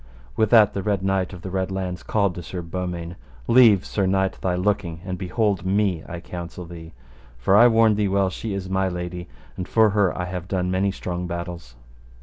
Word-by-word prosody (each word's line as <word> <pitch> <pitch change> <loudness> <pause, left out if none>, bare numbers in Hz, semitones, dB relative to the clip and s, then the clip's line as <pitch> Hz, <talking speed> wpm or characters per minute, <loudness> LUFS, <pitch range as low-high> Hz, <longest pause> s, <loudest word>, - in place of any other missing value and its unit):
With 110 -2 +2
that 105 -3 +6
the 100 - -2
Red 100 -1 -1
Knight 95 -2 0
of 90 -3 -10
the 95 - -6
Red 95 0 -1
Launds 95 -2 -4
called 100 -4 0
to 90 - -7
Sir 90 +1 -6
Beaumains, 85 0 -4 0.3
Leave, 115 -6 +6
sir 100 -2 -1
knight, 95 0 +1
thy 90 -1 0
looking, 90 -3 -1
and 95 -2 -3
behold 100 0 -1
me, 95 -3 +1
I 85 - -5
counsel 85 +1 -7
thee; 85 -1 -11 0.4
for 80 +11 +2
I 120 +4 +8
warn 115 -2 +4
thee 105 -1 +1
well 95 -1 +1
she 105 +1 -4
is 95 -1 -4
my 95 0 0
lady, 90 0 -5 0.3
and 90 - -5
for 110 -2 +4
her 100 -3 +2
I 90 - -2
have 90 -1 -5
done 90 -1 -1
many 95 +1 +1
strong 90 -2 -4
battles. 85 -7 -6
95 Hz, 205 wpm, -23 LUFS, 90-100 Hz, 0.4 s, I